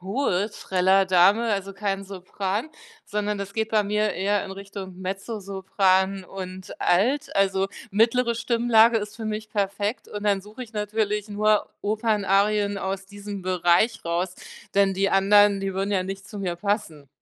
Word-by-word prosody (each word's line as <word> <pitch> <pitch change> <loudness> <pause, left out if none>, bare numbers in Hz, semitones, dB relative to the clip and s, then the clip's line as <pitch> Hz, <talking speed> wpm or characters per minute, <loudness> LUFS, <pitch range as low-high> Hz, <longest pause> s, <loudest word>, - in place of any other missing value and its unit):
hohe 200 0 0
Trällerdame, 190 +3 +3
also, 195 0 -3
kein 195 -1 -2
Sopran, 195 - -4 0.3
sondern 210 0 -2
das 200 0 -5
geht 220 -1 -1
bei 215 -1 +3
mir 210 +1 0
eher 200 +2 0
in 195 - -7
Richtung 195 -1 -8
Mezzosopran 190 -1 0
und 185 0 -8
Alt, 245 - +1
also, 195 -1 +2 0.2
mittlere 235 +3 +2
Stimmlage 230 -1 +4
ist 210 +1 -7
für 225 - -7
mich 215 0 -4
perfekt 205 +2 -2
und 205 - -7
dann 200 -2 +2
suche 210 +6 -10
ich 230 - -11
natürlich 210 0 -1
nur 210 +1 +2
Opernarien 205 -1 +1
aus 195 0 -4
diesem 200 -1 -8
Bereich 180 +4 +2
raus, 175 +2 -1 0.4
denn 195 -1 +3
die 195 +1 +1
anderen, 200 +1 +5
die 195 -1 -3
würden 195 +1 -1
ja 190 -2 +1
nicht 195 +1 -7
zu 210 - -8
mir 180 -3 -2
passen. 175 -7 -2
200 Hz, 155 wpm, -24 LUFS, 190-210 Hz, 0.4 s, anderen